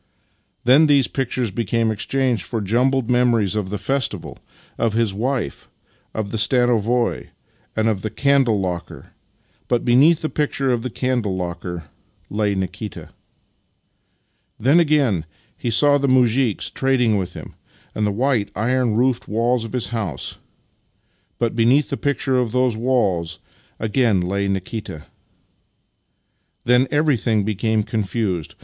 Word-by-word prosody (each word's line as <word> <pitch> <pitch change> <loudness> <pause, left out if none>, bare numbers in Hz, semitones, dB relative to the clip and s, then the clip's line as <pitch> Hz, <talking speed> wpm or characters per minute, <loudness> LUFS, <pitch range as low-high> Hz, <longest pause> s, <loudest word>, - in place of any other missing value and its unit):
Then 135 +6 +6
these 140 -3 +4
pictures 125 -4 -2
became 115 +2 0
exchanged 125 +1 0
for 115 +5 -4
jumbled 125 +5 +1
memories 120 -5 +2
of 105 -3 -2
the 105 - -3
festival, 130 +5 -2 0.4
of 115 -2 0
his 115 -3 +1
wife, 115 - -3 0.4
of 110 -2 -4
the 110 - -2
stanovoi, 120 +1 +1 0.5
and 110 0 +1
of 105 -4 0
the 110 - -3
candle 135 -4 +2
locker 90 -3 -5 0.3
— - - -40
but 120 -1 0
beneath 140 +7 +5
the - - +1
picture 140 -3 -1
of 120 -2 0
the 130 - -4
candle 120 -5 -1
locker 90 -1 -5 0.5
lay 105 -1 0
Nikita. 95 +2 -5 1.5
Then 135 +9 +4
again 140 - +2 0.3
he 120 - -3
saw 145 +5 +4
the 140 - 0
muzhiks 125 -3 +2
trading 125 -5 +2
with 90 -2 -3
him, - - -9 0.4
and 105 -1 0
the - - 0
white, 115 -2 0
iron 120 +1 +1
roofed 125 +1 +1
walls 115 +2 0
of 115 - -9
his 125 -3 -2
house 100 - -4 0.5
— - - -44
but 115 -1 -1
beneath 125 +5 +3
the - - 0
picture 135 -2 0
of 120 -3 -1
those 125 -2 +2
walls 100 -9 0 0.4
again 110 -2 +2
lay 100 +3 -1
Nikita. 95 -4 -4 1.6
Then 125 +2 +3
everything 130 -8 +1
be 110 - 0
came 110 +2 0
confused. 100 -5 -2
115 Hz, 140 wpm, -21 LUFS, 105-130 Hz, 1.6 s, Then